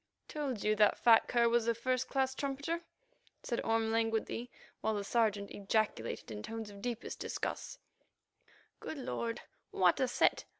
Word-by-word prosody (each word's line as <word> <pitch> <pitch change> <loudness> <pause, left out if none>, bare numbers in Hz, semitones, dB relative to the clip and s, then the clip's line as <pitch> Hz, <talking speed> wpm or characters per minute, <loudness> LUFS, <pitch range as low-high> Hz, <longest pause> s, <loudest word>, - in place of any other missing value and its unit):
"Told 275 -8 -3
you 215 0 +3
that 210 -1 +5
fat 230 -2 +6
cur 235 -1 +3
was 235 0 +2
a 235 - +3
first 255 +2 0
class 265 -1 +1
trumpeter," 285 +5 -2 0.6
said 235 - -1
Orme 225 0 +1
languidly, 225 +1 0 0.3
while 220 +1 0
the 205 - -2
Sergeant 205 -2 +1
ejaculated 200 - -1
in 105 -1 -5
tones 225 - -6
of 200 0 -11
deep 240 +1 -2
disgust: - - -4 1.0
"Good 315 - -6
Lord! 235 -3 -3 0.3
what 180 -2 +3
a 260 - +3
set. 245 - +2
230 Hz, 155 wpm, -34 LUFS, 215-250 Hz, 1.0 s, fat